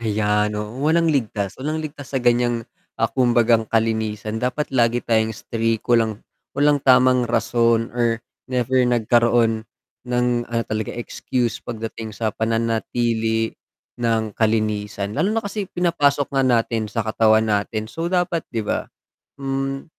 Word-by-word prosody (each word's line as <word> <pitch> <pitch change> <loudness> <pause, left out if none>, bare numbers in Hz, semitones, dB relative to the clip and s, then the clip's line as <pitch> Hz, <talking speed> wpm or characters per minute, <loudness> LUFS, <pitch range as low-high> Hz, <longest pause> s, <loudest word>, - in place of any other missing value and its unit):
Ayan, 105 -1 0
oo, 105 +5 -5
walang 165 0 +3
ligtas, 105 -7 -1
walang 155 +3 -2
ligtas 145 -2 -8
sa - - +3
ganiyang, 120 -1 +2 0.3
ah, - - +1
kumbagang 120 -3 +3
kalinisan 110 -1 -1
dapat 130 +4 -2
lagi 120 -1 +2
tayong 110 -1 +1
strict, 115 -1 -2
walang 115 -3 +1 0.3
walang 145 0 +3
tamang 130 -2 +4
rason 115 0 +1
or 120 -1 +1 0.3
never 130 0 +1
nagkaroon 115 -1 +2 0.4
ng 125 0 +1 0.2
ano 115 -1 0
talaga 110 -1 -3
excuse 120 0 -2
pagdating 115 -1 -6
sa 110 -2 -1
pananatili 115 0 0 0.5
ng 110 -2 0
kalinisan, 105 -2 -1
lalo 160 - +1
na 220 +1 -1
kasi 200 -1 -4
pinapasok 145 -6 +1
nga 135 - +2
natin 115 -3 +1
sa 115 -1 -2
katawan 110 0 +3
natin, 105 0 -1
so, 165 +9 -4
dapat 175 -2 +1
'di 115 -2 -3
ba. - - -2 0.5
Hmm, 135 0 -3
115 Hz, 135 wpm, -21 LUFS, 110-130 Hz, 0.5 s, tamang